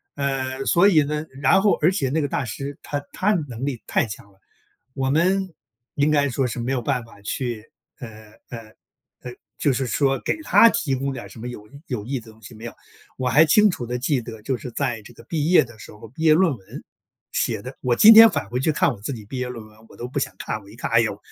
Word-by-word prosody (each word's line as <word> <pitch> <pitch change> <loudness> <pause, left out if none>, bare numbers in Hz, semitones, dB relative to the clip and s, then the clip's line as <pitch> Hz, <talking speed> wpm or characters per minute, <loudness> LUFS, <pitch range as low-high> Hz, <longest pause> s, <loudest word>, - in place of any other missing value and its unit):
呃， 135 -1 -2
所 175 +4 +4
以 165 -6 +5
呢， 150 +2 -3 0.2
然 190 +8 +4
后 210 - +4
而 160 +4 +4
且 180 -9 -1
那 155 +3 0
个 145 - -1
大 140 -1 -2
师 140 +6 -6
他 145 -1 -3
他 210 +3 +1
能 120 +1 -5
力 135 -5 -4
太 - - +1
强 105 -2 -10
了， 95 - -28 0.6
我 135 -1 -1
们 185 +4 +1 0.4
应 145 +1 +2
该 145 -1 +3
说 130 +1 0
是 120 - -5
没 120 +3 -3
有 125 - -1
办 130 -1 -1
法 115 -3 -17
去， 115 0 -4 0.3
呃， 110 -3 -11 0.2
呃， 115 - -6 0.6
呃， 125 - -7 0.3
就 145 - +2
是 130 +1 -1
说 135 +3 +1
给 - - -1
他 230 - +6
提 140 -10 -1
供 135 +1 -2
点 120 - -7
儿 - - -11
什 - - -13
么 120 - -6
有 105 -4 -9 0.2
有 120 -6 -4
益 130 +2 -3
的 110 - -15
东 110 +1 -20
西， 110 - -12
没 110 +2 -9
有。 120 - -8 0.4
我 130 - -3
还 135 +5 +6
清 210 +5 +5
楚 120 -8 -5
地 125 +1 -3
记 135 0 0
得 110 -2 -10
就 130 - -2
是 125 - -8
在 115 -1 -2
这 120 - -15
个 - - -15
毕 155 -1 -2
业 180 - +6
的 120 -2 -15
时 - - -11
候， 105 +1 -13
毕 145 +7 -9
业 155 -1 +6
论 170 -3 +3
文 95 - -11 0.5
写 - - -1
得 130 +2 -8
我 120 -1 0
今 220 +2 +9
天 225 +1 +10
返 100 - -3
回 125 +2 -2
去 155 - +1
看 150 - +2
我 105 - -11
自 130 +7 -4
己 110 -3 -10
毕 130 +5 -7
业 125 0 -2
论 115 -3 -8
文， 110 0 -20
我 - - -16
都 120 - -6
不 130 +3 -4
想 120 -8 -3
看， 110 - -4
我 100 - -17
一 105 - -14
看， 120 - -4
哎 115 0 +5
呦， 110 -3 -1
130 Hz, 280 characters per minute, -22 LUFS, 115-145 Hz, 0.6 s, 天